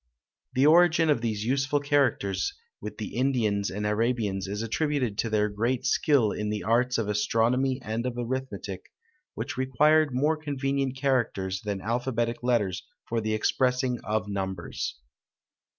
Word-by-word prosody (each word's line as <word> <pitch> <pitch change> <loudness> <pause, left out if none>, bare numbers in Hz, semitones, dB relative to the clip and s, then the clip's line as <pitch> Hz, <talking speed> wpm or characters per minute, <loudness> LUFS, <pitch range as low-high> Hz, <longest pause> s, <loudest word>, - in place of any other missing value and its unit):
The 130 +2 +4
origin 165 0 +5
of 120 - +1
these 110 -2 -2
useful 140 +3 +1
characters 135 -10 0 0.2
with - - -7
the - - -6
Indians 115 -6 +1
and 105 +2 -4
Arabians 105 -3 0
is 105 +3 -3
attributed 130 -1 -1
to 115 - 0
their 105 -1 +2
great 115 +5 -1
skill 130 -9 +3
in 105 0 -3
the 105 0 -3
arts 125 +3 +2
of 115 -3 -1
astronomy 120 +5 +1
and 110 +1 -2
of 120 -1 -4
arithmetic, 130 +2 -5 0.4
which - - -5
required 150 +4 +3
more 150 +5 +1
convenient 135 -3 -2
characters 115 -9 0
than 100 -2 -3
alphabetic 120 +1 -1
letters 115 -7 +1 0.2
for 115 -1 -1
the 110 0 -1
expressing 125 +2 +1
of 110 0 -1
numbers. 95 -3 -4
120 Hz, 145 wpm, -27 LUFS, 105-135 Hz, 0.4 s, origin